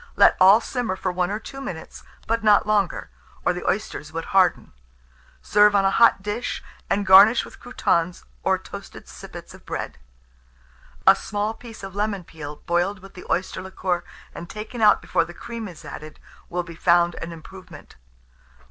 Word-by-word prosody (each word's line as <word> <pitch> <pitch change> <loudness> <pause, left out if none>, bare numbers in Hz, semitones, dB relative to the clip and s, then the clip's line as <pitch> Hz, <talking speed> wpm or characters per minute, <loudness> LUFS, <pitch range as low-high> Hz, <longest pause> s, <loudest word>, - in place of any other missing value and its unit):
Let - - +6
all 195 +4 +8
simmer 240 -7 -2
for 185 0 -2
1 180 0 -1
or 205 - -2
2 270 +5 -9
minutes, 170 -12 -7 0.2
but 230 0 -1
not 210 -1 +5
longer, 210 -4 0 0.3
or 180 - +3
the 180 - -6
oysters 190 -7 -3
would 165 +1 -4
harden. 185 -3 +3 0.7
Serve 210 0 +5
on 195 -1 +3
a 195 - +3
hot 230 -3 +4
dish, 210 +4 -3 0.3
and 200 0 0
garnish 200 +5 +7
with - - -14
croutons, 175 -8 -1 0.2
or - - +2
toasted - - -11
sippets - - -11
of - - -15
bread. - - -5 1.1
A - - +8
small 210 +1 -3
piece 225 -2 -12
of 195 -1 -7
lemon 205 -2 -2
peel 150 -3 -10
boiled 175 +4 0
with 195 +1 -14
the 180 - -11
oyster 185 0 -1
liquor, 185 -2 -2 0.3
and 170 - -9
taken 220 +3 -7
out 210 - +5
before - - +1
the 175 +1 -11
cream 230 +1 -7
is 175 -4 -12
added, 155 0 -9 0.3
will 175 +1 -2
be 170 -1 -10
found 175 +1 +3
an 170 - -5
improvement. 185 +3 -12
190 Hz, 175 wpm, -23 LUFS, 175-210 Hz, 1.1 s, all